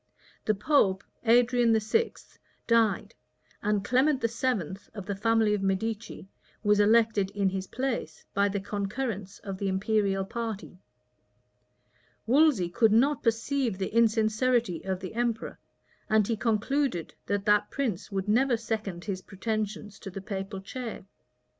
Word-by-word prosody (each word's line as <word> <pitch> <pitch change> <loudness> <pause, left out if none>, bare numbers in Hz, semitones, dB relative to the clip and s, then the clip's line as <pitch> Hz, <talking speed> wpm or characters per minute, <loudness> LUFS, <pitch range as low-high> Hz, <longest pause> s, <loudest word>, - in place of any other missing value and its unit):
The 215 - +2
pope, 195 -4 +2 0.2
Adrian 240 -1 +4
VI., 335 - +1 0.5
died; 230 -3 +2 0.5
and 205 -1 0
Clement 265 +4 +3
VII., 230 - -1 0.2
of 200 -3 -6
the 200 0 -3
family 225 +1 +2
of 205 - 0
Medicis, 205 +3 -2 0.4
was 210 -1 +4
elected 215 -2 +4
in 200 -2 +2
his 190 0 -4
place, 250 - -3
by 200 0 +2
the 200 0 -2
concurrence 205 0 -4
of 195 -2 -5
the 200 - -1
imperial 195 0 +1
party. 220 -4 -5 1.5
Wolsey 260 - +4
could 215 +5 +3
not 265 +6 +3
perceive 230 0 0
the 190 +1 -3
insincerity 225 -2 +2
of 190 -1 -2
the 185 - -6
emperor, 235 -1 -2 0.5
and 215 -2 +3
he 230 - +1
concluded 225 - 0
that 200 -1 -1
that 210 0 +3
prince 225 -10 -3
would 195 0 -2
never 240 +3 +3
second 215 -6 -4
his 190 -3 -3
pretensions 210 +1 -4
to - - -7
the 195 - -6
papal 195 0 -5
chair. 230 +1 -6
215 Hz, 135 wpm, -28 LUFS, 195-235 Hz, 1.5 s, Adrian